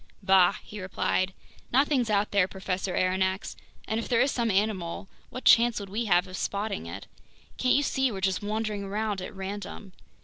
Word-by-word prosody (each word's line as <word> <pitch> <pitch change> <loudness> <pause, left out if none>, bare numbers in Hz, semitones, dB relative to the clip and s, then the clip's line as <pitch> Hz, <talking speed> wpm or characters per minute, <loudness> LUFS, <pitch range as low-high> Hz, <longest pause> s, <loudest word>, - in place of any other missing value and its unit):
"Bah!" 190 -1 +5
he 210 -1 -8
replied. 185 0 0 0.4
"Nothing's 265 -2 +3
out 205 0 +1
there, 200 -3 +3
Professor 190 -1 -3
Aronnax, 190 +1 0 0.3
and 220 +1 -1
if 230 - -4
there 235 - +3
is 275 - +3
some 235 -2 0
animal, 195 -2 -1 0.2
what 255 - -8
chance 235 -1 +6
would 200 -1 -7
we 220 +4 -2
have 180 -2 +3
of 185 -1 -8
spotting 200 - -3
it? 85 - -7 0.5
Can't 255 - +3
you 285 - +3
see 265 -2 +1
we're 195 - -5
just 190 -1 0
wandering 210 0 -2
around 205 0 -2
at 185 - -6
random? 195 0 -7
200 Hz, 180 wpm, -27 LUFS, 190-220 Hz, 0.5 s, chance